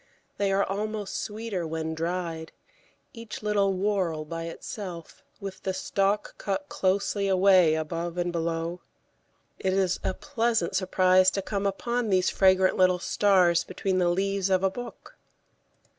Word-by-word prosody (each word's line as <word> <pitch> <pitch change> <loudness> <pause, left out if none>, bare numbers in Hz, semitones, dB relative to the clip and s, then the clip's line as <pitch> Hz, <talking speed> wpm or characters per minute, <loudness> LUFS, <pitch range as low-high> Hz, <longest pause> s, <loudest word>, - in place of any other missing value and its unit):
They 200 -1 +1
are 195 +1 +3
almost 210 +1 -3
sweeter 210 -5 -4
when 160 0 -3
dried, 165 -1 -3 0.6
each 230 -2 -8
little 200 -2 +2
whorl 185 -5 -1
by 165 +1 -5
itself, 170 0 -8 0.2
with 190 -1 -7
the 190 -1 -2
stalk 200 +2 0
cut 250 +9 -3
closely 200 +1 0
away 185 -4 +5
above 165 +2 -3
and 175 0 0
below. 170 +1 -2 0.8
It 190 -1 0
is 190 -1 +1
a 185 - -1
pleasant 235 - -1
surprise 185 0 +4
to 195 0 -3
come 200 0 -1
upon 235 +4 -2
these 185 -1 +2
fragrant 190 -1 +4
little 185 -1 +4
stars 180 -2 +3
between 185 0 -2
the 175 -1 +3
leaves 195 +2 0
of 190 0 +2
a 190 - +2
book. 245 +4 -9
190 Hz, 145 wpm, -27 LUFS, 175-200 Hz, 0.8 s, away